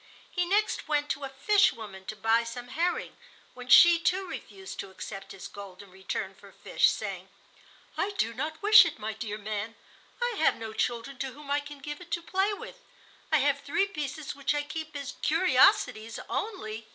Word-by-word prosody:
He 355 -1 0
next 410 +1 +1
went 295 -1 0
to 275 0 -2
a - - -6
fish 400 +10 +4
woman 200 -4 -10
to 215 - -5
buy 225 +2 +2
some 240 +1 -7
herring, 340 +6 -1 0.4
when 250 0 -10
she, 340 +6 +8
too, 370 +3 +1
refused 385 +1 -8
to 195 - -5
accept 195 +1 -8
his 195 - -8
gold 200 -1 -10
in 195 - -17
return 190 +1 -4
for - - -16
fish, - - +2
saying: - - -5 0.7
"I 390 - 0
do 230 +1 +1
not 305 - -5
wish 425 0 +10
it, 330 -3 -3
my 220 +1 -4
dear 210 -1 -5
man; 215 +1 -4 0.4
I 485 -2 -1
have 315 - +4
no 220 -1 -7
children 240 +3 -2
to 265 -2 -3
whom 290 0 -9
I 290 - +3
can 290 0 -9
give 295 +3 -7
it 345 - -12
to 340 - 0
play 385 +4 +1
with. - - -8 0.5
I 310 - +6
have 285 -1 +2
three 305 +7 +1
pieces 300 -5 -5
which 280 +1 0
I 290 - 0
keep 315 +1 -6
as 280 -2 -5
curiosities 270 - +3
only." 225 - -4
280 Hz, 195 wpm, -28 LUFS, 225-345 Hz, 0.7 s, wish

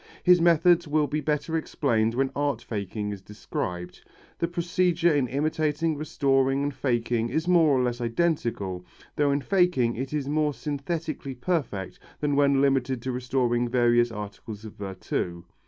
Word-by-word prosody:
His 180 -1 +6
methods 170 0 +4
will 150 0 +2
be 150 +1 -2
better 150 +2 -1
explained 115 -8 0
when 135 +1 +1
art 145 -4 0
faking 105 -2 -4
is 100 -2 -7
described. 90 -3 -6 0.4
The 170 - +1
procedure 175 0 +1
in 140 -3 +1
imitating, 155 +3 0
restoring 135 -2 +1
and 145 0 -1
faking 120 -3 0
is 160 +6 -1
more 165 -6 +5
or 125 - +2
less 120 0 -2
identical, 115 - -1 0.3
though 145 -1 +2
in 140 +1 +1
faking 175 -10 +2
it 130 +1 -4
is 150 -2 -2
more 150 -1 0
synthetically 150 -1 -4
perfect 125 - -2 0.2
than 145 -1 0
when 140 -1 +4
limited 135 -2 +1
to 130 - -2
restoring 125 -1 0
various 120 -1 +3
articles 105 +1 -8
of 110 - -9
virtu. 95 -3 -4
135 Hz, 155 wpm, -26 LUFS, 120-155 Hz, 0.4 s, His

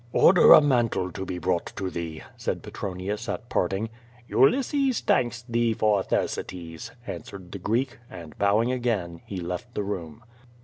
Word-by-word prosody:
"Order 180 0 +8
a - - +9
mantle 120 -10 +1
to 95 +2 -6
be 90 - -3
brought 90 0 -1
to 95 -1 -3
thee," 80 -2 -5
said - - -3
Petronius 100 +4 -4
at 120 - -4
parting. 95 +5 0 0.4
"Ulysses 265 - +3
thanks 120 -1 +1
thee 115 -1 +1
for 105 -2 +3
Thersites," 85 -3 -3 0.2
answered 95 -3 -8
the 100 - -6
Greek, 115 +4 -1
and 85 -5 -10
bowing 105 +4 +3
again, 110 -10 -2
he 100 - -5
left 90 +8 -5
the 105 - -1
room. 90 -2 -5
100 Hz, 150 wpm, -26 LUFS, 90-120 Hz, 0.4 s, a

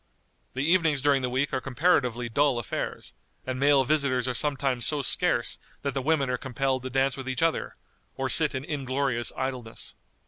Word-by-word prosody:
The 130 - -1
evenings 165 -5 +3
during 140 0 +3
the 125 - -1
week 130 +3 -1
are 130 - 0
comparatively 125 -4 +1
dull 140 +2 +2
affairs, 120 - -4 0.3
and 130 0 -3
male 140 -1 +5
visitors 130 -3 +1
are 125 - 0
sometimes 135 -2 0
so 150 -2 +1
scarce - - 0 0.2
that 140 -1 -1
the 135 - -1
women 145 0 +1
are 125 0 -1
compelled 130 0 -1
to 130 - -5
dance 135 +1 +1
with 130 -1 -6
each 130 +5 -1
other, 165 -1 0 0.4
or 135 - -1
sit 150 +1 +4
in 130 +1 -4
inglorious 135 -4 -1
idleness. 130 -4 -4
135 Hz, 180 wpm, -27 LUFS, 125-145 Hz, 0.4 s, male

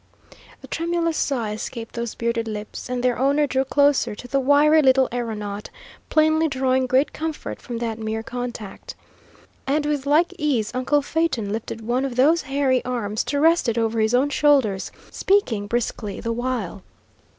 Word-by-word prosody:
A - - -9
tremulous 335 -1 -1
sigh 240 -9 -1
escaped 225 +2 -6
those 235 -1 -4
bearded 230 0 -1
lips, 210 +2 -6
and 250 -1 -2
their 250 -2 +1
owner 280 +3 +3
drew 265 -1 0
closer 280 -3 +2
to 245 - -10
the 275 +2 +1
wiry 290 +3 +5
little 265 -1 +4
aeronaut, 210 -4 -4 0.4
plainly 315 +1 +3
drawing 260 -2 +1
great 260 +3 +2
comfort 315 -1 -5
from 240 -2 -6
that 230 -1 -3
mere 220 0 -3
contact. 240 -4 -6 0.7
And 295 +2 +1
with 290 -2 -1
like 325 +5 +3
ease 245 -8 0
uncle 275 +3 +1
Phaeton 275 -10 -1
lifted 225 +1 -4
one 240 +4 0
of 265 -3 -3
those 300 +7 +4
hairy 270 -2 +1
arms 225 -4 -2
to 285 - -1
rest 325 -3 +4
it 230 - -2
over 225 0 0
his 220 +2 +2
own 275 +3 +2
shoulders, 270 -11 +2 0.2
speaking 255 - +1
briskly 220 -2 -2
the 230 - -2
while. 235 -6 -3
255 Hz, 165 wpm, -23 LUFS, 225-290 Hz, 0.7 s, wiry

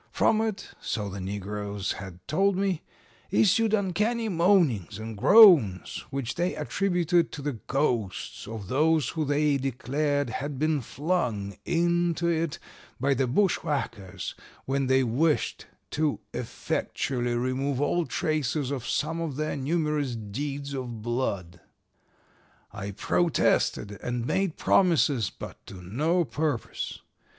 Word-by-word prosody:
From 220 - +3
it, 220 -3 -3
so 105 -3 -2
the 95 0 -6
negroes 100 +1 -3
had 90 -2 -8
told 195 +5 +2
me, 190 -4 0 0.5
issued 220 +2 +3
uncanny 215 +4 0
moanings 165 - +2
and 110 0 -6
groans 150 - +6
which 135 -3 -3
they 175 +2 -1
attributed 175 -3 +1
to 145 - -6
the 140 -6 -3
ghosts 120 -11 -1
of 110 -3 -6
those 155 - +2
who 160 - -2
they 145 0 +2
declared 140 +1 -1
had 140 +4 -4
been 155 0 +1
flung 120 - -2
into 170 0 +1
it 165 -2 0 0.4
by 140 +1 +2
the 135 0 +1
bushwhackers 120 - -1 0.3
when 135 0 0
they 130 0 +4
wished 145 +7 0 0.2
to 155 -1 0
effectually 120 -2 -2
remove 130 +2 -1
all 165 +3 +1
traces 150 -2 -1
of 130 -4 -4
some 165 +2 -1
of 160 -5 -3
their 155 +2 -2
numerous 150 -2 0
deeds 140 +6 -4
of 120 -5 -5
blood. 100 -8 -2 1.1
"I 100 -1 -6
protested 105 - +1
and 120 -1 -2
made 190 +3 0
promises, 150 - +3
but - - -10
to - - -9
no 150 - 0
purpose. 135 - -3
140 Hz, 125 wpm, -27 LUFS, 115-165 Hz, 1.1 s, groans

